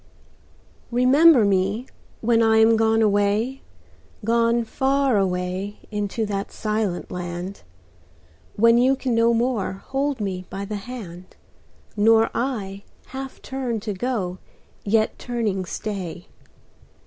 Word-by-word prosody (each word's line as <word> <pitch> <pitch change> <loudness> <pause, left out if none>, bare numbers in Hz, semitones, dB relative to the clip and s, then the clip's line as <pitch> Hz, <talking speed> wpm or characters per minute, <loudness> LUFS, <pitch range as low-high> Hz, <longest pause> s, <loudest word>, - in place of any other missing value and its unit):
Remember 255 +2 +5
me 200 +4 +1 0.4
when 230 0 +3
I 220 -1 +4
am 225 +1 +6
gone 225 0 +3
away, 210 +5 +1 0.6
Gone 230 +1 +2
far 270 +2 +1
away 185 +1 -1
into 210 +1 -2
the 200 -1 -3
silent 215 -4 -2
land; 180 +2 -5 0.9
When 230 +2 +5
you 260 +2 +4
can 260 -2 -2
no 230 0 +4
more 235 -4 0
hold 270 +6 -3
me 185 -3 -4
by 195 +1 -5
the 210 +1 -4
hand, 195 -5 -9 0.6
Nor 225 +1 +4
I 205 -6 -3 0.3
half 265 0 -7
turn 255 -4 -3
to 210 -1 -3
go 195 -4 -3 0.4
yet 215 +1 +1
turning 220 -6 -2
stay. 180 -3 -5
220 Hz, 115 wpm, -23 LUFS, 195-240 Hz, 0.9 s, am